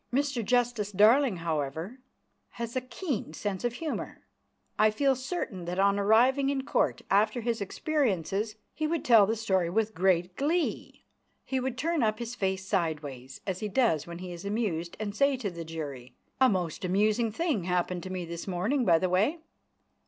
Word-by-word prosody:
Mr 275 -2 0
Justice 240 -3 +1
Darling, 220 +3 +5
however, 160 - -3 0.5
has 235 +1 -5
a 255 - +1
keen 255 - -4
sense 195 0 -3
of 240 -1 0
humour. 315 +4 -5 0.5
I 215 - +6
feel 270 +5 +2
certain 255 - -4
that 175 +1 -4
on 200 +1 +3
arriving 250 +7 +4
in 270 -1 -1
Court - - 0
after 215 +5 +3
his 230 -1 -1
experiences 210 - -1 0.2
he 310 - -1
would 330 -1 -2
tell 225 -5 +7
the 225 - +1
story 190 -6 +1
with 220 +3 0
great 180 -1 +1
glee. 320 +5 -1 0.4
He 265 - -1
would 255 -1 -3
turn 325 +3 0
up 215 -2 +1
his 235 +1 -5
face 190 -4 -2
sideways, 150 -9 -3
as 185 -2 -2
he 215 - -2
does 200 - +1
when 170 0 -7
he 180 0 -7
is 175 +1 -8
amused, 200 -5 -2
and 210 -2 -3
say 280 +2 +3
to 215 -6 -3
the 170 -1 -6
jury: 145 -6 -7 0.2
"A 260 -1 +6
most 180 -4 -2
amusing 210 +5 +2
thing 285 - -1
happened 180 0 0
to 185 - -7
me 185 -2 -4
this 170 +2 -7
morning, 200 +9 0
by 170 -7 +5
the 185 - 0
way 205 - +2
210 Hz, 180 wpm, -29 LUFS, 180-250 Hz, 0.5 s, tell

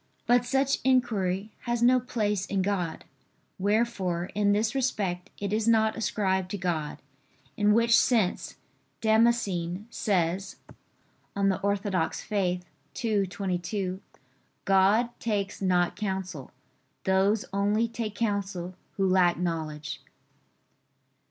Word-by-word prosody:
But 245 0 +3
such 270 +2 +1
inquiry 215 -6 +1
has 240 -1 0
no 255 +1 +6
place 210 -5 -1
in 195 -2 0
God; 185 -4 -2 0.5
wherefore 195 -4 0
in 205 -1 +2
this 215 +3 +1
respect 200 -9 -1
it 200 0 -3
is 220 +1 0
not 220 -1 +3
ascribed 190 -4 0
to 205 - -3
God: 170 -5 -2 0.6
in 210 0 +3
which 230 +2 +5
sense 220 -7 +2 0.4
Damascene 215 -5 +1
says 190 -2 0 0.8
(De 200 - -1
Fide 195 -1 +2
Orth. 200 -4 -1
ii, 195 +3 -1
22): 185 0 -3 0.6
"God 195 +5 +4
takes 205 -4 -2
not 180 -2 +2
counsel: 190 -8 -4 0.5
those 195 +3 +2
only 205 +3 +2
take 225 -2 -5
counsel 200 -5 -2 0.2
who 195 -1 +2
lack 185 -2 +4
knowledge." 155 -5 -3
200 Hz, 110 wpm, -27 LUFS, 185-220 Hz, 0.8 s, no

